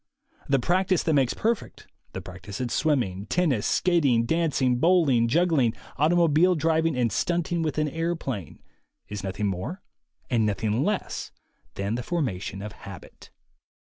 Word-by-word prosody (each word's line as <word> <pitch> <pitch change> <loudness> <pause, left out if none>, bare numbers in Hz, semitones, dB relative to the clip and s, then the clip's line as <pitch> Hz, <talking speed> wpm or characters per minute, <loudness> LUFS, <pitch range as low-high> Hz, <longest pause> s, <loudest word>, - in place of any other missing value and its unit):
The 140 - +4
practice 185 +6 +1
that 160 - +1
makes 135 -4 +2
perfect, 230 0 -2 0.3
the - - -5
practice 95 +2 -9
at 125 -2 -2
swimming, 110 - 0
tennis, 155 -12 +1
skating, 140 -10 +2
dancing, 140 -5 +1
bowling, 155 -9 +4
juggling, 150 -4 +2 0.2
automobile 170 +2 +4
driving 160 0 +1
and 120 -3 +1
stunting 175 -1 0
with 155 -2 -2
an 155 0 +1
airplane, 160 - -4 0.5
is 105 -1 -5
nothing 100 +2 -3
more 100 - -3 0.4
and 115 -3 +1
nothing 105 +4 0
less 210 +3 -2 0.4
than 100 +2 -2
the 120 - -2
formation 105 - -3
of 105 - -6
habit. 100 -5 -12
140 Hz, 135 wpm, -26 LUFS, 110-170 Hz, 0.5 s, The